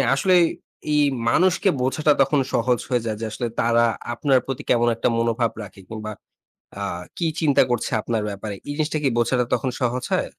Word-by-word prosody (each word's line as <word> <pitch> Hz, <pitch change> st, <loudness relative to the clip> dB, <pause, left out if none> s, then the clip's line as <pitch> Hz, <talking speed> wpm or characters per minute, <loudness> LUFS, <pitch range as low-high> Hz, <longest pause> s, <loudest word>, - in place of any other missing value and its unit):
আসলে 185 Hz, +7 st, +3 dB, 0.6 s
এই 150 Hz, -, +4 dB, 0.3 s
মানুষকে 185 Hz, -, +3 dB
বোঝাটা 150 Hz, +4 st, +2 dB
তখন 140 Hz, +1 st, +3 dB
সহজ 120 Hz, 0 st, +2 dB
হয়ে 125 Hz, -2 st, +1 dB
যায় 110 Hz, -1 st, -2 dB
যে, -, -, -2 dB
আসলে 120 Hz, +2 st, -3 dB
তারা 115 Hz, 0 st, +3 dB, 0.3 s
আপনার 135 Hz, +2 st, +2 dB
প্রতি 135 Hz, +2 st, -5 dB
কেমন 120 Hz, 0 st, +3 dB
একটা -, -, 0 dB
মনোভাব 115 Hz, 0 st, +1 dB
রাখে, 95 Hz, -1 st, -12 dB
কিংবা 110 Hz, -1 st, -6 dB, 0.7 s
আ -, -, -1 dB, 0.3 s
কি 170 Hz, -, 0 dB
চিন্তা 150 Hz, -4 st, +4 dB
করছে 120 Hz, -2 st, -1 dB
আপনার 110 Hz, -1 st, -2 dB
ব্যাপারে। 100 Hz, 0 st, -6 dB
এই 145 Hz, -, -2 dB
জিনিসটা 155 Hz, 0 st, 0 dB
কি 135 Hz, -, +3 dB
বোঝাটা 125 Hz, +1 st, +2 dB
তখন 130 Hz, -, 0 dB
সহজ 125 Hz, +1 st, 0 dB
হয়? -, -, +1 dB
125 Hz, 180 wpm, -22 LUFS, 115-140 Hz, 0.7 s, এই